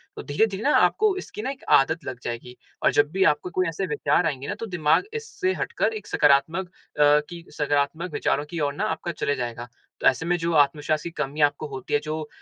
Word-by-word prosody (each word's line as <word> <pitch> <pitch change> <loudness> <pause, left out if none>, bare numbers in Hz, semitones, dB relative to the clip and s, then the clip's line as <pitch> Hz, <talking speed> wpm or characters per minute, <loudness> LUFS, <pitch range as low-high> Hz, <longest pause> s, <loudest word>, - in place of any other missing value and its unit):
तो - - -7
धीरे-धीरे 195 +7 0
ना 290 - +3
आपको 425 -2 +3
इसकी 365 - -7
ना 260 - -2
एक 275 - -11 0.2
आदत 160 +4 -1
लग 130 -2 -5
जाएगी 120 +1 -6 0.3
और - - +5
जब 145 +1 +2
भी 190 +1 +2
आपको 180 - -9
कोई 185 +1 0
ऐसे 165 +4 -3
विचार 150 +3 +1
आएँगे 140 -4 -2
ना, - - -3
तो - - -6
दिमाग 175 - +2
इससे 450 -4 -2
हटकर - - -1
एक 435 - -7
सकारात्मक 150 +6 +3
अ, 150 -4 +2
की 170 -1 -9
सकारात्मक 150 +4 0
विचारों 145 0 0
की 170 - -5
ओर 145 -2 0
ना, 195 - -3
आपका 175 -5 -3
चले 145 - -1
जाएगा। 120 -1 -5 0.3
तो - - -5
ऐसे 150 +5 +2
में 175 +1 +2
जो 170 0 -1
आत्मविश्वास 150 +1 +2
की - - -4
कमी 150 0 -3
आपको 145 +1 +2
होती 135 -2 -7
है, 145 - +4
जो 155 0 -5
155 Hz, 220 wpm, -24 LUFS, 145-180 Hz, 0.3 s, और